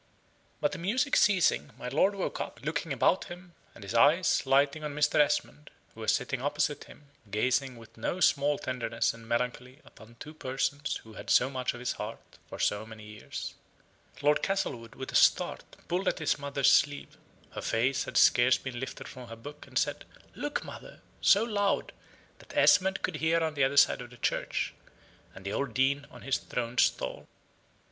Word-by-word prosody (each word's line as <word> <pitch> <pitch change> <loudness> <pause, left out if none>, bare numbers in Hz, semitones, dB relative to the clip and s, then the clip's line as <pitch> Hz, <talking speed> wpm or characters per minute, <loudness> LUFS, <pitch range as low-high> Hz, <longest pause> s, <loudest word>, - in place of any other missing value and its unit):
But - - +1
the - - -6
music 255 +11 +1
ceasing, 190 -7 +3
my 125 - -6
lord 170 +10 +2
woke 195 - -3
up, 120 - -6
looking 160 +1 -2
about 135 +8 +2
him, 180 -1 -11 0.2
and 110 - -12
his 100 +3 -6
eyes 145 +5 +4
lighting 140 +3 +3
on 150 -1 -4
Mr. 150 0 +2
Esmond, 150 0 +1 0.2
who 110 - -11
was 110 - +2
sitting 135 -2 -1
opposite 145 +1 -1
him, 145 -1 -17 0.2
gazing 125 +5 0
with 115 -1 -15
no 170 +10 -2
small 145 -4 +3
tenderness 125 -2 -1
and 115 -1 -13
melancholy 125 +2 -2
upon 115 +1 -16
two 155 - -9
persons 140 0 -2
who 110 - -14
had - - -9
so 130 +2 +4
much 130 -2 -2
of - - -9
his 125 0 -2
heart - - -8
for - - -7
so 105 +1 0
many 110 -1 -11
years, 105 0 -7 0.7
Lord 150 +1 +4
Castlewood, 130 - -2
with 130 - -6
a - - -6
start, - - +2
pulled 180 +3 -1
at - - +1
his 155 -1 0
mother's 140 -1 +2
sleeve 145 0 +2 0.4
(her - - -6
face 125 +4 0
had - - -3
scarce 120 +1 +5
been 125 -3 -6
lifted 130 - -6
from 125 -1 -10
her 115 - -8
book), 145 +6 -11
and - - -5
said, - - 0 0.3
"Look, 290 0 -3
mother!" - - -11 0.2
so 200 +2 +5
loud, 205 -3 0 0.5
that - - -11
Esmond 190 0 +4
could 175 - -1
hear 160 +2 +2
on 160 -1 0
the 140 -2 +1
other 135 +2 +1
side - - +5
of 120 - -9
the 120 - -15
church, - - -1 0.6
and 95 - -12
the 100 - -3
old 135 -5 -2
Dean 140 +2 +1
on - - -13
his 135 - 0
throned 120 0 -3
stall. - - 0
140 Hz, 190 wpm, -29 LUFS, 120-155 Hz, 0.7 s, scarce